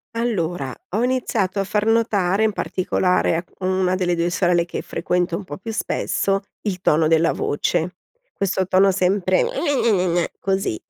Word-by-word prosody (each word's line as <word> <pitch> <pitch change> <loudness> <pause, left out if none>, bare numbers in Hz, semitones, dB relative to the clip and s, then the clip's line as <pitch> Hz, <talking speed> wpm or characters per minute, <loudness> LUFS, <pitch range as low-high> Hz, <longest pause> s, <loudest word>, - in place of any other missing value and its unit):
Allora, 175 - -2 0.2
ho 215 +5 0
iniziato 235 -6 0
a 195 - +1
far 210 +2 -1
notare 215 -4 +2
in 220 - +2
particolare 180 -2 0
a 170 - -3 0.2
1 185 0 +1
delle 180 -1 0
2 170 0 0
sorelle 175 -1 +2
che - - -5
frequento 175 -1 -1
un 205 - -8
po' 145 -5 -7
più 220 +4 -6
spesso, 195 -2 -1 0.2
il 185 -4 -3
tono 155 -2 +3
della 165 +1 +3
voce, 165 +4 -1 0.4
questo 190 -1 0
tono 190 +1 +4
sempre: 185 0 +2
"gne-gne-gne-gne", 190 - +1
così. 195 - -1
185 Hz, 155 wpm, -21 LUFS, 175-205 Hz, 0.4 s, tono